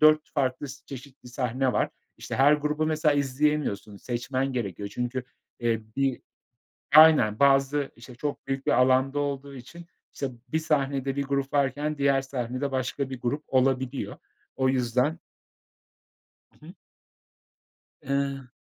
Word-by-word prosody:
4 155 0 +5
farklı 135 0 -1
s 140 +1 -11
çeşitli 135 -2 -10
sahne 125 +1 -1
var. - - +1 0.3
İşte, - - -6
her 140 +3 +6
grubu 150 +1 0
mesela 155 -1 +2
izleyemiyorsun, 140 -7 0
seçmen 130 +4 -2
gerekiyor. 100 -4 -3
Çünkü, 125 +2 -3 0.4
eee, 115 -2 +1 0.2
bi 135 -2 0 0.7
Aynen, 150 -10 +7
bazı 140 0 +3
İşte, 120 +1 -13
çok 145 +2 -4
büyük 135 0 -3
bir - - +2
alanda 130 +3 +3
olduğu 140 -1 -3
için, 165 +7 -11 0.3
işte, 140 - -3 0.2
bir 160 - +1
sahnede 140 -3 0
bir 140 - 0
grup 140 0 -2
varken 145 +2 0
diğer 140 -1 +3
sahnede 130 +1 -3
başka 130 +1 -2
bir 130 - -6
grup 145 +5 -2
olabiliyor. 130 0 0 0.4
O 130 0 +2
yüzden 130 +5 +1 1.4
Hı - - -16
hı. - - -11 1.3
Eee 140 -1 -2
135 Hz, 135 wpm, -27 LUFS, 130-145 Hz, 1.4 s, Aynen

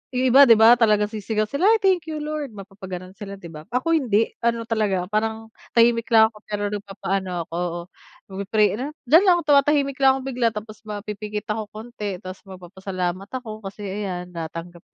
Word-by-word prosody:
yung 255 0 +2
iba 275 - +9
'di 230 - +8
ba, 225 +2 +8
talagang 210 -2 +3
sisigaw 215 0 -1
sila, 285 - 0
"Ay 450 - +5
thank 370 -4 +2
you 310 - -4
Lord!" 300 -2 -4
mapapaganon 190 -2 -8
sila 200 0 -8
'di 175 - -14
ba, 155 0 -11
ako 255 +7 0
hindi. 230 -8 +2
Ano 230 0 0
talaga 210 -5 0
parang 220 +1 -2 0.3
tahimik 230 0 +4
lang 220 0 +6
ako 210 - -15
pero 205 0 -2
nagpapaano 195 -2 -3
ako 165 - -7 0.7
nag 190 - -7
pi-pray. 210 0 +3
Ano, 260 - -2 0.2
diyan 320 +8 +6
lang 350 -1 +6
tumatahimik 280 -1 +3
lang 270 - +7
akong 265 - -7
bigla, 240 -1 +2
tapos 215 0 -7
mapipikit 210 0 -5
ako 220 - -3
konti 215 -3 -6
tapos 185 0 -8
magpapasalamat 185 0 -5
ako 225 -4 -6
kasi 200 +1 -8
ayan 190 -3 -4
natanggap 170 +1 -7
215 Hz, 180 wpm, -23 LUFS, 195-240 Hz, 0.7 s, iba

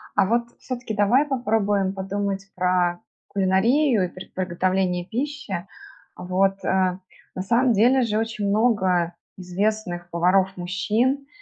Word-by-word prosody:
А - - +4
вот 235 +4 +1 0.2
всё-таки 245 -4 -5
давай 220 +8 +3
попробуем 210 -7 0
подумать 195 0 -3
про 180 -1 +1 0.3
кулинарию, 210 +5 +2
и - - -3
пр 185 +1 -10
приготовление 185 0 0
пищи. 240 -6 -4 0.5
Вот, 195 +2 0
э, 185 -1 +1 0.4
на 185 - -3
самом 240 +4 +3
деле 245 +6 +4
же, 220 -3 0
очень 225 -2 -2
много 190 -6 +2 0.2
известных 180 -1 -2
поваров- 185 +3 +2
мужчин 215 +10 0
195 Hz, 120 wpm, -23 LUFS, 185-225 Hz, 0.5 s, А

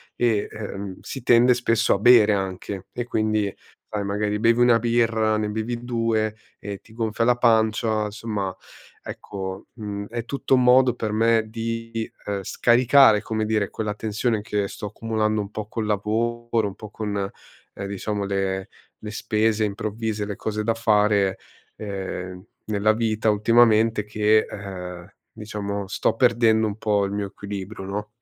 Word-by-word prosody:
e, 115 -4 +1
ehm, 100 -3 -6
si 135 - -7
tende 125 +1 +6
spesso 115 -2 +2
a - - -3
bere 110 -2 +6
anche 95 0 -4
e 120 - -2
quindi 110 -3 0 0.4
sai, 105 -1 -2
magari 105 +1 -1
bevi 115 +1 +3
1 120 -1 +6
birra, 115 -2 +2
ne 105 -1 -1
bevi 115 +3 -3
2 115 -3 0 0.2
e 100 -1 -6
ti 110 - -19
gonfia 115 0 -1
la 125 0 +4
pancia. 110 -2 +2
Insomma 105 -3 -4 0.5
ecco, 95 -1 -7
mhmm, 100 -3 -6
è 115 0 -4
tutto 135 +1 -1
un 125 - +3
modo 125 0 +5
per 110 -3 -3
me 115 0 +3
di 115 0 -4 0.3
scaricare, 120 -1 +5
come 110 -1 -2
dire, 105 -2 0
quella 105 -1 -3
tensione 110 +1 -1
che 105 -1 -1
sto 105 - -6
accumulando 110 0 -1
un 100 - -6
po' 110 -1 -5
col 110 0 -3
lavoro, 115 +2 0
un 95 - -7
po' 105 -2 -10
con, 100 -3 -3 0.6
diciamo, 100 +1 -3
le 95 0 -2 0.3
le 105 0 -6
spese 110 +1 0
improvvise, 105 +1 -3
le 100 0 -5
cose 105 0 -3
da 115 +1 +1
fare, 105 -3 +2 0.4
ehm, 95 -3 -5 0.3
nella 110 +1 +2
vita 110 -1 +1
ultimamente 110 0 +4
che, 105 +1 +2
ehm, 90 -2 -8 0.2
diciamo 100 -2 -5
sto 100 - 0
perdendo 115 -3 +3
un 105 +1 -5
po' 105 -2 +1
il 100 - -4
mio 100 -1 -2
equilibrio, 100 0 -7
no? 105 +2 -4
110 Hz, 155 wpm, -23 LUFS, 100-115 Hz, 0.6 s, tende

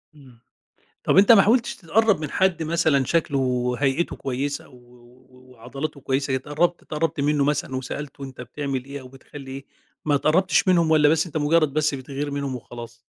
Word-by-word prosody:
إمم، 130 -5 -17 0.6
طب - - +2
أنت 200 +4 +7
ما 215 - +8
حاولتش 235 +4 +2
تتقرب 205 +2 +2
من 150 - -4
حد 185 -4 +1
مثلًا 155 -4 +2
شكله 155 -3 0
وهيئته 130 +4 0
كويسة 140 +2 -4
و - - -21
و 125 +1 -20
و 130 0 -20
وعضلاته 135 +5 -7
كويسة 135 +1 -1
اتقربت 150 +6 -1
اتقربت 155 -1 -3
منه 145 0 +2
مثلًا 145 -2 -1
وسألته 140 +2 -6
أنت 130 -2 -8
بتعمل 135 0 -4
إيه 140 0 -7
أو 130 - -11
بتخلّي 135 +1 -12
إيه، 135 +1 -8 0.4
ما 145 - +2
اتقربتش 180 +7 +2
منهم 170 -3 +3
والّا 150 -2 +5
بس 160 +2 +2
أنت 160 -2 -5
مجرد 155 -1 +2
بس 155 -1 +1
بتغير 140 +2 -5
منهم 140 -2 -3
وخلاص؟ 120 -1 -10
140 Hz, 180 wpm, -23 LUFS, 130-160 Hz, 0.6 s, ما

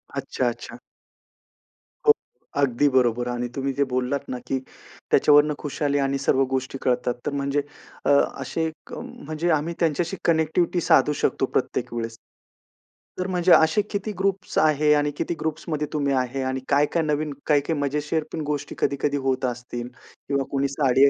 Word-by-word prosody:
अच्छा, - - -1
अच्छा. - - -8 1.3
हो. - - +11 0.5
अगदी 140 +1 +3
बरोबर 120 -2 +2
आणि 120 0 -2
तुम्ही 135 0 -1
जे 140 - +2
बोललात 130 +3 -1
ना 125 - -3
की 135 - 0 0.5
त्याच्यावरून 150 0 +5
खुशाली 145 0 -1
आणि 140 0 +1
सर्व 135 0 +3
गोष्टी 130 0 -2
कळतात 125 -1 +1
तर - - 0
म्हणजे 140 +1 0 0.4
अ, - - +2 0.3
असे 160 +4 -1 0.2
क - - -11
म्हणजे 155 +3 -4
आम्ही 155 +2 +1
त्यांच्याशी 170 +3 0
कनेक्टिव्हिटी 170 +2 +2
साधू 150 - +4
शकतो - - +1
प्रत्येक - - -2
वेळेस. 115 -1 -4 1.0
तर 185 - -1
म्हणजे 180 -1 +2
असे 160 +6 +5
किती 205 +1 -2
ग्रुप्स 195 0 -1
आहे? 150 -1 +4
आणि 145 0 +2
किती - - -1
ग्रुप्समध्ये 155 -1 -2
तुम्ही 140 -2 +1
आहे? 130 +1 -1
आणि 130 0 -1
काय-काय 145 +4 +2
नवीन 150 -1 -1
काय-काय 150 +1 +2
मजेशीर 150 +2 -1
पण 160 - -2
गोष्टी 145 -1 -3
कधी-कधी 140 +1 0
होत 130 0 +1
असतील 120 -1 -4 0.4
किंवा 140 -1 +1
कोणी 140 0 +1
साडी 140 0 +4
145 Hz, 155 wpm, -24 LUFS, 135-155 Hz, 1.3 s, हो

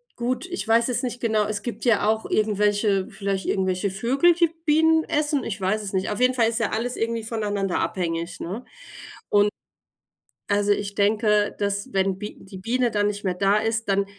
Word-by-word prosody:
gut, 250 +7 -2
ich 360 -9 -4
weiß 230 +2 +3
es 245 - +1
nicht 245 -1 -4
genau 215 -3 +1
es 205 -1 -3
gibt 230 -1 -5
ja 215 -4 +3
auch 220 0 +1
irgendwelche 205 -2 +1
vielleicht 195 -1 -3
irgendwelche 190 0 0
Vögel, 265 - +3
die 340 -1 +2 0.2
Bienen 320 +1 +4
essen, 295 -2 0
ich 210 -2 -4
weiß 215 +3 0
es 195 - -6
nicht. 190 0 -1
Auf 210 - -3
jeden 250 +1 +4
Fall 230 -3 +2
ist 230 +1 -2
ja 230 - 0
alles 240 +3 -2
irgendwie 230 0 -2
voneinander 205 -4 -2
abhängig, 170 -2 -2
ne? 200 +9 -6 0.6
Und 205 0 +4 1.0
also, 205 0 +2
ich 200 0 -1
denke, 210 0 +2
dass, 200 0 -2
wenn 190 -1 +1
Bi 210 0 -7
die 190 0 -11
Biene 240 +4 0
dann 205 -1 +1
nicht 205 0 -3
mehr 185 -2 -1
da 195 +2 +3
ist, 225 +1 -1
dann 195 0 +2
210 Hz, 195 wpm, -24 LUFS, 200-235 Hz, 1.0 s, Bienen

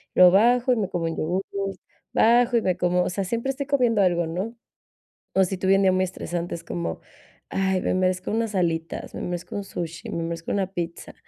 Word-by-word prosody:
luego 180 -1 +8
bajo 240 +6 +4
y 245 - +3
me 205 -3 0
como 175 -3 -2
un 165 0 -2
yogur, 180 +5 -1 0.7
bajo 240 +2 +4
y - - +2
me 185 -1 +1
como 180 0 +2
o - - -1
sea, 195 +2 -2
siempre 235 +7 -1
estoy 280 +1 -4
comiendo 245 -7 +3
algo, 175 -2 +2
¿no? 185 +8 -4 0.8
O 190 - +5
si 185 +1 -3
tuve 190 +1 +4
un 195 - +2
día 190 - +5
muy 185 0 +2
estresante, 175 -1 -4
es 170 - -6
como: 85 -1 -4 0.5
"Ay, 190 -1 0
me - - 0
merezco 185 0 0
unas 225 -1 -1
alitas, 165 -3 -1
me - - -6
merezco 175 +2 -4
un 200 - -3
sushi, 170 -3 -6
me 170 - -3
merezco 165 0 -4
una 195 -2 0
pizza", 170 -2 -5
185 Hz, 215 wpm, -24 LUFS, 175-210 Hz, 0.8 s, luego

